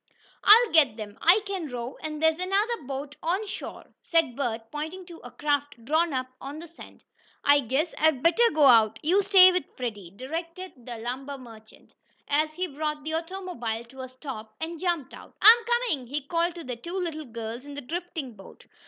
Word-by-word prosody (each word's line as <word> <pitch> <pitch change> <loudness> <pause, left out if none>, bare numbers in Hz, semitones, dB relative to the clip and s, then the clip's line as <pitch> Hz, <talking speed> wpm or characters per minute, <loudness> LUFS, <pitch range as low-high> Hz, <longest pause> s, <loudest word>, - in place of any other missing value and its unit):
"I'll 450 +2 +7
get 280 -9 +4
them 210 -1 -8
I 360 +6 +6
can 385 -5 -4
row, 245 0 -5
and 305 -1 -5
there's 320 +1 +3
another 405 +6 0
boat 280 +1 -5
on 370 +6 -1
shore," 400 - -7 0.2
said 330 -8 +1
Bert, 225 -4 -3
pointing 320 +5 -5
to 345 -2 -11
a - - -11
craft 290 -5 -2
drawn 320 +5 +2
up 255 -1 -1 0.2
on 280 +2 -7
the 335 +2 -9
sand. 335 - -15 0.4
"I 285 0 +6
guess 280 +6 -1
I'd 310 -5 +2
better 460 +8 +5
go 300 -2 +5
out 225 -4 +6
you 365 +6 +3
stay 380 -2 +7
with 360 -5 -1
Freddie," 210 -8 -5
directed 325 - -7
the 240 -2 -6
lumber 260 +5 -5
merchant, 225 -4 -15 0.3
as 310 +2 +1
he 370 - -1
brought 300 -1 -4
the 315 +1 -4
automobile 330 -10 -4
to 265 +1 -10
a 260 - -7
stop, 255 -5 -9
and 325 +1 -5
jumped 340 -7 -2
out. - - -13
"I'm 445 +3 +9
coming!" 475 - 0
he 290 +4 -3
called 335 +4 -1
to 340 - -8
the 250 -4 -5
two 345 +9 -6
little 325 -4 -3
girls 230 0 -6
in 285 0 -9
the 285 - -5
drifting 320 -2 -5
boat. 195 -2 -15
300 Hz, 195 wpm, -26 LUFS, 250-345 Hz, 0.4 s, I'm